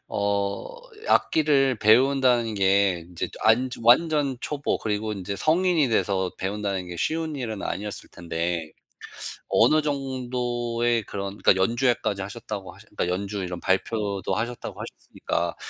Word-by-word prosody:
어 100 - -1 0.4
악기를 135 -5 +3
배운다는 120 0 +4
게 95 -2 +3
인제 85 0 -5
안 120 +4 +4
완전 140 +2 +4
초보 145 0 -2
그리고 110 0 -2
인제 100 0 -4
성인이 165 - +2
돼서 95 -5 +1
배운다는 100 -1 -2
게 90 0 -7
쉬운 160 - -1
일은 110 -6 -4
아니었을 105 +1 -4
텐데 85 -1 -3 0.8
어느 155 - +4
정도의 120 -4 -1
그런 100 +1 -5
그러니까 - - +4
연주회까지 115 -2 +1
하셨다고 100 -1 -6
하셨 - - -17
그러니까 - - -1
연주 100 +1 -4
이런 90 -1 -4
발표도 100 +1 -1
하셨다고 120 +4 -4
하셨으니까 - - -4
110 Hz, 315 characters per minute, -25 LUFS, 100-130 Hz, 0.8 s, 배운다는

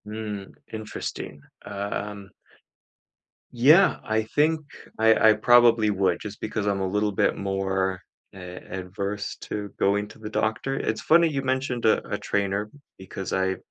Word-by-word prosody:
Mm, 105 -2 -6 0.2
interesting, 110 -8 -6 0.2
um 100 0 -5 1.2
Yeah, 150 +11 +6
I 110 0 +1
think 155 +7 +1 0.4
I 110 0 +5
I - - +5
probably 115 0 +5
would 95 -3 +1
just 105 -1 -7
because 105 -1 -3
I'm 100 -1 +1
a 95 - -1
little 105 +2 0
bit 100 - +1
more 95 -1 -1 0.3
a 90 -2 -9 0.2
adverse 100 +3 -4
to 105 -1 -5
going 100 +1 +1
to 110 - -15
the 105 -1 -6
doctor. 110 +5 -1
It's 110 - -2
funny 170 +1 +5
you 140 -4 -2
mentioned 130 -2 -1
a 110 - +4
a - - -1
trainer 100 +1 -1 0.3
because 95 0 -6
I, 95 0 0
105 Hz, 145 wpm, -25 LUFS, 100-110 Hz, 1.2 s, Yeah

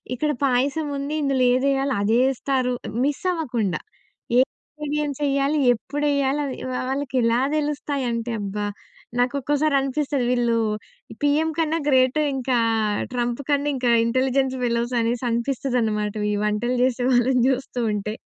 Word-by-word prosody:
ఇక్కడ 300 +4 0
పాయసం 275 +4 +1
ఉంది. 280 +2 -3
ఇందులో 270 -2 +2
ఏదెయాలో 270 +1 +1
అదే 220 +3 +2
యేస్తారు. 260 -1 0 0.3
మిస్సవ్వకుండా. 275 - -1 0.6
ఏ - - +7
ఇంగ్రీడియెంట్స్ 295 +1 -4
యెయ్యాలి. 280 +2 +1
ఎప్పుడెయ్యాలి 280 +2 0
అది 270 - -5
వా 255 - -2
వాళ్ళకి 270 -1 -3
ఎలా 230 +1 +3 0.2
దెలుస్తాయంటే, 275 -6 -2
అబ్బా! 205 +1 -3 0.5
నాకొక్కోసారి 280 +4 +1
అనిపిస్తది 275 -1 -1
వీళ్ళు 240 -2 +2 0.6
పీఎం 295 +2 +2
కన్నా 325 0 +1
గ్రేటు 260 0 +3 0.2
ఇంకా 255 -1 0 0.6
'ట్రంప్' 240 +1 -1
కన్నా 285 0 +2
ఇంకా 250 -2 +1
ఇంటెలిజెన్స్ 260 +2 +1
ఫెలోస్ 235 +1 0
అనేసనిపిస్తదనమాట. 235 -2 -1 0.2
ఈ - - 0
వంటలు 240 +4 0
చేసే 255 -1 -1
వాళ్ళని 250 +1 +3
జూస్తూ 265 -1 -1
ఉంటే. 210 +1 -3
260 Hz, 120 wpm, -23 LUFS, 240-285 Hz, 0.6 s, ఏ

